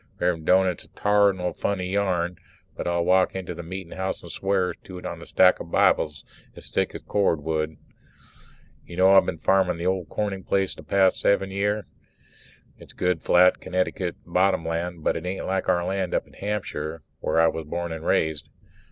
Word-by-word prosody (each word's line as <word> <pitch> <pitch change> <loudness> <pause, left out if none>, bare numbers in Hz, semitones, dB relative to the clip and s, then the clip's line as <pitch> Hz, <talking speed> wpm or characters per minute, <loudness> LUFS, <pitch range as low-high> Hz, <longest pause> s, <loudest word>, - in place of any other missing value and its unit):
Rev'rend 85 -3 0
Doane, 95 +1 +5
it's 90 -3 -2
a - - -21
tarnal 100 -3 +2
funny 95 -3 -2
yarn 90 -3 0 0.4
but - - -4
I'll 85 0 +1
walk 95 +1 +3
into 95 -2 -4
the - - -7
meetin' 90 +1 -7
house 95 0 -3
and - - -9
swear 95 -2 0
to 95 - -12
it 90 - -10
on - - -5
a - - -11
stack 90 0 +4
o'Bibles 75 -3 +1 0.3
as - - -9
thick - - 0
as - - -6
a - - -33
cord 100 -5 +1
of 75 - -13
wood. 80 -1 -1 1.1
You 85 - -11
know 95 +1 +6
I've 95 - +6
been 85 - -2
farming 90 +2 +2
the 85 - -5
old 95 -2 -1
Corning 100 -3 -3
place 95 -1 0
these - - -12
past 95 -1 +3
seven 95 -1 +2
year? 105 +1 -1 0.9
It's - - -14
good 90 -3 0
flat 90 +1 +5
Connecticut 90 -1 -2
bottom 90 -1 +1
land, 85 0 -3
but - - +1
it 85 - -4
isn't 90 +1 -4
like 95 0 -1
our 85 0 +2
land 95 -1 -1
up - - 0
in - - -21
Hampshire 80 -7 -4 0.2
where 80 - 0
I 80 - +6
was 80 -1 -1
born 85 +2 -4
and 80 0 -6
raised. 80 -4 0
90 Hz, 200 wpm, -25 LUFS, 85-95 Hz, 1.1 s, know